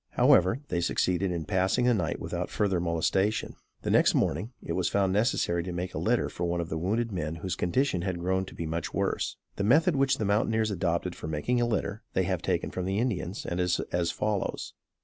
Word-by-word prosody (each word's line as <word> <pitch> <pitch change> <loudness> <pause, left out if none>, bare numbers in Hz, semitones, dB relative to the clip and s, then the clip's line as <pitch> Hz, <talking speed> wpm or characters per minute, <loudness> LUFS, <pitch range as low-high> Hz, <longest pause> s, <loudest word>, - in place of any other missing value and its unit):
However, 95 +9 +4
they 85 - 0
succeeded 90 +2 +1
in 85 -3 -3
passing 95 +8 +1
the 125 - +4
night 85 -8 -1
without - - -3
further 95 -4 +1
molestation. 90 +5 0 0.3
The - - -1
next - - +4
morning, 90 - 0
it 85 - -4
was 90 0 0
found 95 -2 +1
necessary 100 -5 +1
to 90 +2 -5
make 90 +1 -4
a - - -3
litter - - +1
for 90 - -5
one 85 0 -1
of 85 0 -3
the 80 - -2
wounded 110 +7 0
men 80 -4 -3
whose 90 +1 -3
condition 95 +1 +1
had 95 -1 -2
grown 95 +2 0
to - - -11
be 85 - -4
much 80 +1 -3
worse. - - -1 0.2
The - - -1
method 155 - +4
which 135 0 +2
the 110 - -1
mountaineers 110 +1 +1
adopt 90 -1 -1
for - - -7
making 80 +11 0
a 120 - +2
litter, 105 -2 -2
they 95 - +2
have 90 -1 -1
taken - - -1
from 90 - -3
the 95 +1 -1
Indians, 105 -5 -2
and 85 - -2
is 90 -1 +1
as 85 -1 +1
follows. 105 -2 -2
95 Hz, 220 wpm, -28 LUFS, 85-105 Hz, 0.3 s, However